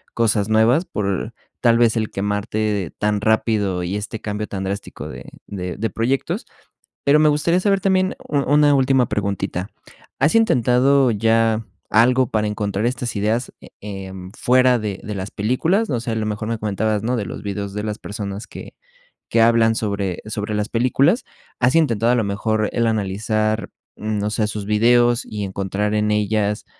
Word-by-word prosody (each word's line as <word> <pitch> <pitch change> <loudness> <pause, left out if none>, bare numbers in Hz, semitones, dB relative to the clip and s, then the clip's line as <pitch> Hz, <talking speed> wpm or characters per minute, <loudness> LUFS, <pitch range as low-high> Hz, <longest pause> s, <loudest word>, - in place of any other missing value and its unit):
cosas 110 -3 +1
nuevas 115 +10 +3
por, 100 - -3 0.3
tal 115 -1 +4
vez, 115 -1 +3
el 110 -2 -1
quemarte 105 -2 -2
tan 105 -1 0
rápido, 105 -4 +1
y 90 +4 -2
este 110 +2 -5
cambio 105 0 -4
tan 95 -1 -4
drástico 100 +1 -5
de - - -9 0.2
de 90 -3 -5
de 110 +2 -1
proyectos. 125 +6 -1 0.6
Pero 145 +2 +5
me 155 0 +5
gustaría 150 +4 +2
saber 195 0 +1
también, 190 -1 +1
u 145 - -1
una 145 +1 +4
última 130 -2 +3
preguntita, 100 -2 -2 0.5
¿has 145 +4 +2
intentado 130 - +4
ya 115 +1 +2 0.3
algo 125 +3 +4
para 105 -1 0
encontrar 105 0 -2
estas 125 -1 -3
ideas, 110 +5 -1
eh, - - -12
em, 95 -2 -8
fuera 125 0 +4
de 105 -3 -4
de 105 - -5
las 95 +1 -5
películas? 160 - 0
O 125 - 0
sea, 115 -1 -3
a - - -2
lo 110 - -1
mejor, 110 +1 -3
me 115 - -1
comentabas, 105 0 -1
¿no?, 125 +3 0
de 110 -4 -2
los - - -7
videos 100 0 -4
de 105 +1 -4
las 105 0 -4
personas 100 0 -6
que - - -10 0.6
que 115 - +3
hablan 115 0 +4
sobre 100 -4 -2
sobre 105 0 -4
las 105 +1 -2
películas, 135 - +2 0.3
¿has 125 +1 +3
intentado 120 -8 +3
a - - +3
lo 120 - +1
mejor 110 +1 -1
el 120 - +1
analizar, 110 +1 -1 0.3
mm, 105 0 -2
no 105 +1 -1
sé, 110 0 0
sus 105 -1 -5
videos 120 +3 +3
y 105 -1 -5
encontrar 100 +2 -2
en 105 0 +1
ellas, 105 0 0
110 Hz, 175 wpm, -21 LUFS, 105-120 Hz, 0.6 s, Pero